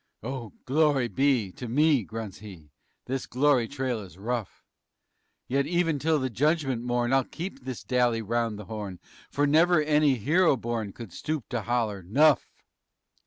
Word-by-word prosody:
"Oh, 120 -2 -5
glory 140 -2 +2
be 130 -8 +1
to 125 - -8
me" 145 +2 +3
grunts 110 -1 -7
he. 90 -8 -12 0.3
"This 130 0 -3
glory 130 -2 +2
trail 130 -3 -2
is 95 -3 -11
rough, 115 +1 -4 0.8
Yet 140 +2 0
even 165 -3 +1
till 155 +2 +2
the 130 -2 -1
Judgment 140 -1 +1
Morn 120 +1 0
I'll 135 0 +4
keep 170 +3 -7
this 130 -2 -6
dally 120 -3 +1
'round 115 0 -1
the 105 - -8
horn, 105 -4 -6 0.3
For 145 - +1
never 160 +3 +4
any 150 -2 +3
hero 150 - +3
born 115 -3 -3
_Could 115 -2 -10
stoop 155 - -4
to 120 - -2
holler: 110 -3 -1
Nuff! 140 - +3
125 Hz, 160 wpm, -27 LUFS, 115-145 Hz, 0.8 s, I'll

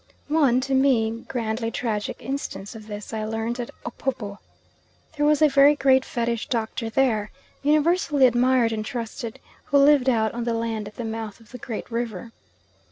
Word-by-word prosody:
One, 280 -5 +3
to 270 +1 -2
me, 235 -4 +2
grandly 225 -2 -2
tragic 220 -3 -3
instance 250 -7 -5
of 220 -2 -11
this 210 +1 -7
I 220 -1 -2
learnt 225 +2 -3
at 240 - -4 0.2
Opobo. 235 -4 -4 0.8
There 295 0 +2
was 300 +1 +4
a - - +8
very 280 +1 +6
great 265 -2 +4
Fetish 235 -3 -2
doctor 225 -1 -2
there, 225 -4 +1 0.3
universally 300 -1 +3
admired 245 -1 +3
and 215 -1 -2
trusted, 230 +1 -5 0.3
who 285 - +2
lived 280 -2 +5
out 220 -3 +1
on 235 0 -3
the 230 -1 -1
land 225 -2 -2
at 210 - -11
the 240 - -5
mouth 220 -2 -5
of 225 -2 -20
the 250 - -9
Great 225 +1 -6
River. 230 -2 -4
235 Hz, 170 wpm, -24 LUFS, 220-270 Hz, 0.8 s, a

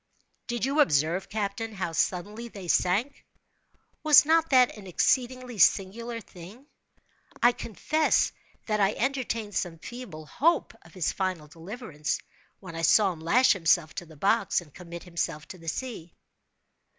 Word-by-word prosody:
"Did 240 -1 -1
you 280 +3 0
observe, 165 - +2
captain, 215 +1 -3
how 185 -3 -3
suddenly 200 +7 -2
they 195 -5 -10
sank? 205 +12 +1 0.8
Was 300 -2 +7
not 325 +1 +3
that 255 -2 +5
an 205 -3 -11
exceedingly 250 +4 0
singular 230 +6 +2
thing? 200 +5 -13 0.8
I 240 - +7
confess 305 +7 0 0.3
that 215 -1 0
I 200 +1 +3
entertained 230 -5 -2
some 175 -4 -2
feeble 185 -3 -9
hope 320 - +1
of 165 - -19
his 180 -4 0
final 185 -5 -3
deliverance, 165 - -5 0.4
when 180 -4 -10
I 165 - -4
saw 195 +4 +4
him 165 - -13
lash 205 +11 +4
himself 165 -4 +2
to 175 - -7
the 160 -1 -15
box, 200 +5 +2
and 160 -5 -14
commit 170 -1 -9
himself 170 -4 -4
to 185 - -9
the 165 - -14
sea." 205 -7 -6
200 Hz, 150 wpm, -27 LUFS, 170-240 Hz, 0.8 s, Was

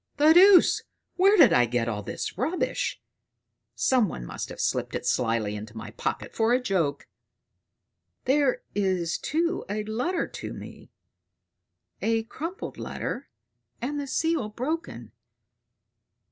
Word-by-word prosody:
The 305 +2 +6
deuce! 375 +2 +7 0.3
Where 395 +3 +5
did 335 - +7
I 125 - +5
get 120 0 0
all 105 -3 -2
this 100 - -5
rubbish? 350 +4 -1 0.8
Some 245 -7 +3
one - - -6
must - - -6
have - - -9
slipped - - -1
it - - -4
slyly 115 -4 0
into 110 +2 -8
my 110 -2 -7
pocket - - -4
for 225 +1 +2
a 250 - +4
joke. 175 - -1 1.2
There 270 -1 +2
is 185 -4 0
too 335 +3 -1
a 210 +1 -2
letter 250 - -1
to - - -7
me; - - -11 1.1
a 225 0 +1
crumpled 330 +11 -6
letter - - -5 0.5
and 290 +4 -3
the 285 - -4
seal 320 -5 0
broken." 310 +10 -4
225 Hz, 130 wpm, -26 LUFS, -, 1.2 s, deuce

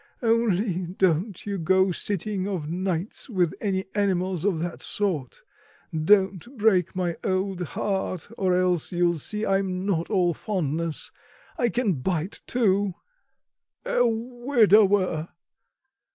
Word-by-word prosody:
Only 210 -5 +1
don't 185 +1 0
you 200 -2 -3
go 190 +3 +3
sitting 195 +1 -2
of 180 -7 -3
nights 180 - -3
with 180 -7 +1
any 190 -2 -1
animals 190 -4 0
of 200 -5 +2
that 170 +1 -4
sort; 170 - -2 0.5
don't 190 - +2
break 200 -6 +2
my 175 -2 -1
old 190 -1 -1 0.2
heart, 190 -3 -2
or 185 -3 +1
else 180 -3 +1
you'll 175 -2 +1
see 210 +8 -2
I'm 195 -1 0
not 170 -5 0
all 180 -4 +2
fondness 165 -4 -2 0.4
I 240 - +1
can 235 -4 +1
bite 175 +3 -2
too... 200 -5 +1 0.9
a - - +2
widower!" 220 - +2
190 Hz, 120 wpm, -25 LUFS, 175-205 Hz, 0.9 s, go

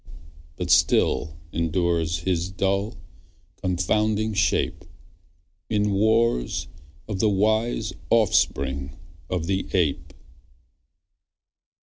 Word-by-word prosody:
But 90 +1 -2
still 80 -1 +3 0.2
endures 85 -1 0
his 90 0 -1
dull, 100 +3 -1 0.6
confounding 105 +4 0
shape: 100 - 0 0.9
In 105 -1 +1
wars 110 - +1 0.4
of 105 -4 -4
the 110 - +3
wise 110 +1 +1 0.2
offspring 70 - +1 0.3
of 90 -3 -2
the 95 +1 -1
ape. 85 -7 0
95 Hz, 80 wpm, -24 LUFS, 85-105 Hz, 0.9 s, still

